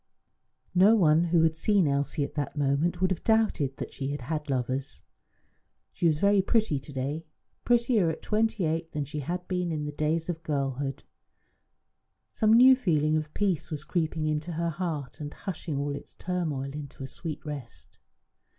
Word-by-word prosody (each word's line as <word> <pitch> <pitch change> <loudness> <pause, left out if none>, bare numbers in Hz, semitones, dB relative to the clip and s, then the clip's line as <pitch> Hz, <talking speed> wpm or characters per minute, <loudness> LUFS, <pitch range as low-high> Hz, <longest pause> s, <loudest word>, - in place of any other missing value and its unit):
No 195 +5 +6
one 165 -4 +4
who 170 -1 +3
had 160 -1 +3
seen 195 0 +3
Elsie 140 +2 0
at - - -5
that 145 0 -3
moment 145 +5 +1
would 185 0 +2
have 180 - -2
doubted 215 - +2
that - - -6
she 135 - -4
had 145 0 -3
had 150 +3 -4
lovers. 130 +1 -2 0.9
She 170 - +1
was 155 -2 +3
very 200 +3 +4
pretty 200 - +1
to 135 - -12
day; 145 +4 -3 0.4
prettier 235 -6 +3
at 160 - -5
twenty 220 -1 +1
eight 165 +1 -2
than 150 -2 -2
she 150 +2 -5
had 180 +5 -4
been 180 -2 -1
in 150 -2 -2
the 150 - -3
days 155 +2 -1
of 165 -2 -3
girlhood. 135 -2 -2 1.3
Some 220 -1 +3
new 255 +3 +8
feeling 155 - +1
of 155 -1 -2
peace 190 -7 0
was 150 -2 -5
creeping 160 -1 -1
into 155 +2 -1
her 170 +1 -1
heart 160 -6 -4
and 145 0 -5
hushing 170 -6 -4
all 140 0 -1
its - - -10
turmoil 155 -7 -2
into 145 -2 -8
a - - -3
sweet 160 +2 -6
rest. 140 -6 -8
155 Hz, 180 wpm, -28 LUFS, 145-180 Hz, 1.3 s, new